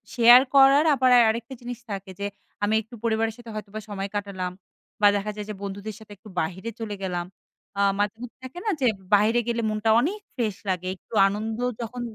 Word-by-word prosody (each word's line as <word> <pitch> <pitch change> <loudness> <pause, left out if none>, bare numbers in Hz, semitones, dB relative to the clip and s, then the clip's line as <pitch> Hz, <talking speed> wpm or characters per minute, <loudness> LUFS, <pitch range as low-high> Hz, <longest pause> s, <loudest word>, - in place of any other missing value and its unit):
Share 240 +1 +9
করার। 275 +2 +7
আবার 260 -1 +3 0.2
আরেকটা 230 +3 -3
জিনিস 245 -1 -6
থাকে 195 -1 -5
যে, 200 - -2 0.4
আমি 205 +1 +2
একটু 225 +3 -13
পরিবারের 225 -1 +1
সাথে 240 -1 -12
হয়তোবা 215 0 -6
সময় 200 -1 -4
কাটালাম, 195 -3 -3 0.5
বা 205 - +7
দেখা 205 +1 -2
যায় 210 -1 -5
যে, - - -3
বন্ধুদের 200 +1 -6
সাথে 215 -1 -15
একটু 210 +2 -14
বাহিরে 190 +7 -3
চলে 210 -2 -4
গেলাম। 175 -2 -2 0.5
আ - - +3 0.2
মাঝে 205 +1 0
মধ্যে 245 -1 -9
থাকে 260 +7 -8
না? - - +1
যে, - - +3 0.3
বাইরে 215 +4 +5
গেলে 235 0 0
মনটা 215 +1 0
অনেক 355 - -1 0.2
ফ্রেশ 220 -6 -1
লাগে, 185 -1 -1
একটু 190 - -21
আনন্দ 215 +2 -3 0.2
যখন 240 +2 -5
215 Hz, 195 wpm, -25 LUFS, 200-235 Hz, 0.5 s, Share